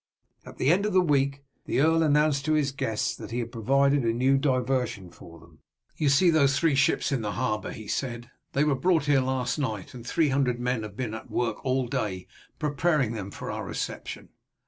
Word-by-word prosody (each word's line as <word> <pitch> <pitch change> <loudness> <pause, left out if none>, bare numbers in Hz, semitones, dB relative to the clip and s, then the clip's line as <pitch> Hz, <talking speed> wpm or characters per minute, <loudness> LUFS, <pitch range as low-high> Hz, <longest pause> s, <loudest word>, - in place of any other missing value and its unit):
At - - -11
the 135 - +3
end 200 +4 +2
of 210 - -3
the 185 - +5
week 140 -4 +1 0.2
the - - 0
earl 160 +3 +4
announced 150 -2 +3
to 155 - +2
his 145 -3 +1
guests 110 -5 -2
that - - -9
he 115 - -4
had 115 -1 -3
provided 140 +4 +2
a 115 - +2
new 130 +4 +2
diversion 125 - -1
for 85 -1 -14
them. 80 -1 -20 0.4
"You 150 - +1
see 170 +6 +5
those 140 -4 +3
three 165 -3 +2
ships 135 +1 +2
in 135 -4 0
the 105 -1 -3
harbour," 110 -5 -2
he 110 - -9
said. 120 0 -4 0.2
"They 140 - +2
were 150 -1 +2
brought 160 +3 +2
here 145 -2 +3
last 130 +1 -1
night, 110 -9 -3
and 120 -2 -9
three 155 +5 +1
hundred 130 -3 +1
men 125 -1 -1
have 105 -2 -8
been 120 -4 -3
at 110 - -8
work 115 -3 -2
all 130 -1 0
day 105 -8 -3 0.3
preparing 150 -4 +1
them 100 -3 -5
for - - -6
our - - -4
reception. - - -5
130 Hz, 215 wpm, -27 LUFS, 115-145 Hz, 0.4 s, the